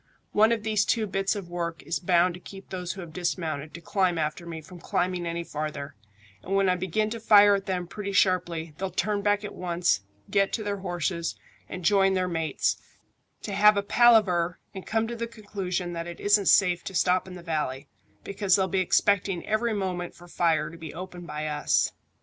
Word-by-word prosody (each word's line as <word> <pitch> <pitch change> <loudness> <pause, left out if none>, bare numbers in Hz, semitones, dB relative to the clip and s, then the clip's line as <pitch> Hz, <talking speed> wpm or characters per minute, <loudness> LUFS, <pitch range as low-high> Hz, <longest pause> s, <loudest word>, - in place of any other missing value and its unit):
One 220 +2 +4
of 225 -2 0
these 215 -2 +2
two 225 0 +1
bits 195 0 -1
of 200 -4 -6
work 170 -1 -4
is - - -2
bound 175 0 +3
to 180 - -9
keep 195 +1 -12
those 180 -2 -4
who 190 - -8
have 165 -3 -10
dismounted 160 -4 -3
to 170 - -9
climb 180 0 +1
after 155 +2 -2
me 165 -1 -6
from 175 +3 -12
climbing 175 0 -1
any 170 0 -3
farther, 150 -3 -5 0.5
and 195 - -3
when 195 -1 +3
I 180 - +3
begin 190 +4 -1
to 230 - -4
fire 205 -2 +7
at 200 0 -1
them 180 -2 -1
pretty 200 +3 -5
sharply 175 -5 +1
they'll 190 0 -2
turn 200 +3 -1
back 205 +1 +1
at - - -6
once, 175 - 0 0.3
get 195 -1 +2
to 220 - -1
their 205 -1 -2
horses, 175 -2 -2 0.3
and 185 -2 -6
join 195 -1 +4
their 185 -1 +1
mates, 160 -5 0 0.7
to 205 - -4
have 210 +1 +6
a 200 - +1
palaver 200 -7 +4 0.2
and 190 - -8
come 225 0 0
to 235 - -5
the 235 0 -3
conclusion 195 -5 -4
that 170 0 -4
it 170 - -8
isn't 205 -1 +3
safe 180 -3 +4
to 195 -1 -6
stop 180 +1 +2
in 185 - -9
the 175 - -10
valley, 150 -4 -3 0.4
because 200 -2 +1
they'll 190 -1 +2
be 190 +1 0
expecting 185 0 +2
every 220 +1 0
moment 180 -3 -3
for 175 - -15
fire 160 -3 +1
to 165 - -11
be 160 -2 -8
opened 180 -1 -8
by 150 0 -4
us. 150 -1 +1
185 Hz, 210 wpm, -27 LUFS, 170-200 Hz, 0.7 s, fire